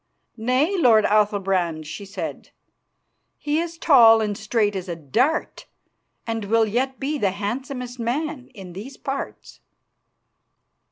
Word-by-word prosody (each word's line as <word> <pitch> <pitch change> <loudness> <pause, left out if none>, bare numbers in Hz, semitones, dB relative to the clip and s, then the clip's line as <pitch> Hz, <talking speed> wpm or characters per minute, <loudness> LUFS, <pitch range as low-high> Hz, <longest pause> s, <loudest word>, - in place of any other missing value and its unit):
"Nay, 255 - +1
lord 225 -8 +5
Athalbrand," 195 -6 +1
she 200 +6 -7
said; 195 - -6 0.9
"he 300 +1 -1
is 335 0 -4
tall 235 -10 +7
and 210 -2 -1
straight 210 -1 0
as 185 -1 -5
a 170 - -3
dart, 240 - -1 0.6
and 225 -2 -3
will 225 +2 +3
yet 255 +5 -1
be 290 +2 -2
the 200 - +2
handsomest 245 +5 -5
man 260 +3 -3
in 190 -4 -10
these 230 +9 -9
parts." 275 0 -6
225 Hz, 125 wpm, -23 LUFS, 200-270 Hz, 0.9 s, tall